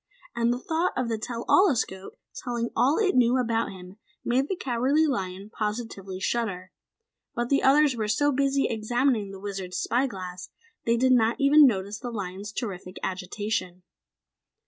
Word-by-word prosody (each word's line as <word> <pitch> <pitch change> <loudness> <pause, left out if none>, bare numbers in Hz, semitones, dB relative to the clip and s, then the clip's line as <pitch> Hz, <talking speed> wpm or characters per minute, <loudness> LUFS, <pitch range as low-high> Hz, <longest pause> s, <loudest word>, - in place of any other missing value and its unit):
And 235 0 +2
the 245 - 0
thought 320 +7 -1
of 255 -2 -1
the 225 -1 -2
tell 235 +1 -5
all 385 +1 +6
escope 195 - -2 0.2
telling 235 -2 -3
all 275 +5 +3
it 410 -4 +2
knew 250 0 +4
about 230 -2 0
him 185 +1 -11 0.3
made 260 +3 +1
the 385 - -2
Cowardly 270 +2 +1
Lion 195 -6 -3
positively 210 -4 -4
shudder. 190 -4 -2 0.6
But 240 0 -2
the 280 - +3
others 280 0 +4
were 220 -2 -2
so 290 +8 +2
busy 275 0 +1
examining 230 0 0
the 195 0 -9
Wizard's 190 -2 -5
spy 250 +4 +1
glass, 185 -5 -7 0.4
they 230 0 +3
did 260 +2 +3
not 230 -2 +4
even 290 +1 +7
notice 205 -2 -2
the 245 - -5
lion's 200 -2 -5
terrific 190 -5 -6
agitation. 185 0 -3
230 Hz, 165 wpm, -26 LUFS, 195-260 Hz, 0.6 s, even